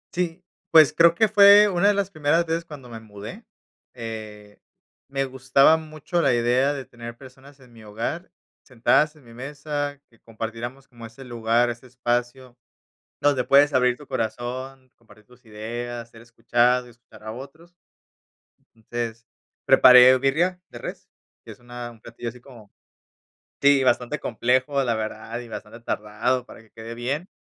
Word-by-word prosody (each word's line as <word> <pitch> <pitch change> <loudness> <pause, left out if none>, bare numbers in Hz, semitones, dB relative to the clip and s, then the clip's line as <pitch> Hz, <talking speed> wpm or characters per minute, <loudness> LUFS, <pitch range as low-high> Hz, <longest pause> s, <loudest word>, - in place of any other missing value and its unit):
Sí. 180 0 -2 0.3
Pues, 155 -4 +6
creo 170 0 +5
que 220 +4 +3
fue 205 0 +7
una 190 +2 +2
de 205 - +5
las 200 -1 -1
primeras 155 +1 +1
veces, 165 +1 -2
cuando 145 -6 -11
me 115 -1 -8
mudé. 110 - -11 0.5
Eh, 110 -3 -9 0.5
me 135 0 -1
gustaba 135 +4 +3
mucho, 155 +2 -3
la 130 - +3
idea 125 +4 +2
de 135 -2 -6
tener 120 -1 -10
personas 135 +1 -16
en 125 -2 -19
mi 115 - -15
hogar, 115 - -5 0.3
sentadas 145 +5 +1
en 150 - -20
mi 115 - -16
mesa, 145 +2 -5
que 115 - -26
compartiéramos, 115 +4 -7
como 120 -3 -12
ese 115 +4 -14
lugar, 120 0 +1
ese 120 +2 -11
espacio, 120 0 -3 0.7
donde 140 -3 +2
puedes 145 +1 +5
abrir 125 -1 +2
tu 145 - -15
corazón, 130 +2 -5
compartir 110 -2 -21
tus 125 +1 -22
ideas, 115 +2 -6
ser 115 - -16
escuchado 120 +2 +1
y 120 - -14
escuchar 115 -2 -19
a 110 - -6
otros. 155 +8 -12 1.0
Entonces, 115 0 -6 0.4
preparé 125 0 +8
birria 170 +7 0
de - - -11
res, - - -8 0.3
que - - -11
es - - -23
una 120 0 -8
un 115 -1 -19
platillo 115 0 -7
así 125 - -13
como 120 -5 -16 0.9
Sí, 140 -1 +5
bastante 125 +3 0
complejo, 130 +4 0
la 120 -3 0
verdad, 110 +1 -5
y 120 - -9
bastante 110 +1 -9
tardado, 115 +3 -2
para - - -14
que 110 - -24
quede 115 +1 -9
bien. 140 - -4
125 Hz, 160 wpm, -23 LUFS, 115-145 Hz, 1.0 s, preparé